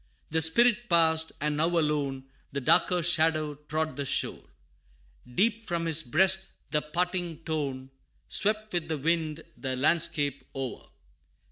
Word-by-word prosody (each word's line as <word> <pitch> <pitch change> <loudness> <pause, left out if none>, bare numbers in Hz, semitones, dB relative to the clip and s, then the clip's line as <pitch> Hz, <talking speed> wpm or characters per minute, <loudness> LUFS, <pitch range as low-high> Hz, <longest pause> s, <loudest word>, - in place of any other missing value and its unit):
The 160 +1 +2
Spirit 235 +8 +3
passed, 160 -1 +3
and 150 0 0
now 160 +2 +3
alone, 145 -4 0 0.3
The 140 - -2
darker 175 +6 +3
Shadow 155 -2 +2
trod 155 +2 -3
the 145 - -1
shore - - 0 0.8
Deep 225 - +1
from 170 -1 -1
his 165 -1 0
breast 190 +7 +1 0.2
the 150 - +2
parting 175 +1 -2
tone 135 -5 -3 0.4
Swept 215 0 -1
with 170 -2 -1
the 160 -1 -2
wind, 160 +1 -1
the 130 -1 -3
landscape 145 0 +1
o'er. 135 -2 -5
160 Hz, 135 wpm, -28 LUFS, 150-175 Hz, 0.8 s, Spirit